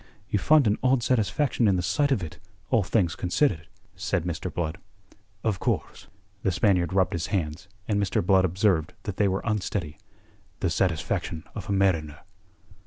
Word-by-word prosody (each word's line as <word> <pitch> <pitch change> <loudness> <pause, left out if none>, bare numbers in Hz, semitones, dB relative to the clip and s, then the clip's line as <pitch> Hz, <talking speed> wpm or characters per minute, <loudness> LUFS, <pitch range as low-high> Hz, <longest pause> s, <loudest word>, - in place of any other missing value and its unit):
"You 105 - +2
find 150 +5 +5
an 105 0 +2
odd 130 -1 +3
satisfaction 125 +1 +1
in 100 - +4
the 90 - -1
sight 140 - +1
of 105 -9 +1
it 80 - -8 0.3
all 115 -4 +4
things 95 -3 +1
considered," 90 - 0 0.3
said 100 -1 -1
Mr. 85 -2 -3
Blood. 85 +1 -3 0.6
"Of 105 -5 0
course." - - -2 0.3
The 95 - +1
Spaniard 90 -3 +2
rubbed 95 -1 +2
his 85 -2 -2
hands, 85 -2 -2 0.2
and 105 -2 +1
Mr. 95 -3 0
Blood 95 0 +5
observed 95 -3 +1
that 100 - -5
they 105 - +3
were 95 0 -1
unsteady. 100 -7 -2 0.6
"The - - 0
satisfaction 80 -2 -1
of - - -7
a - - 0
mariner." 85 -7 +1
95 Hz, 170 wpm, -26 LUFS, 85-105 Hz, 0.6 s, find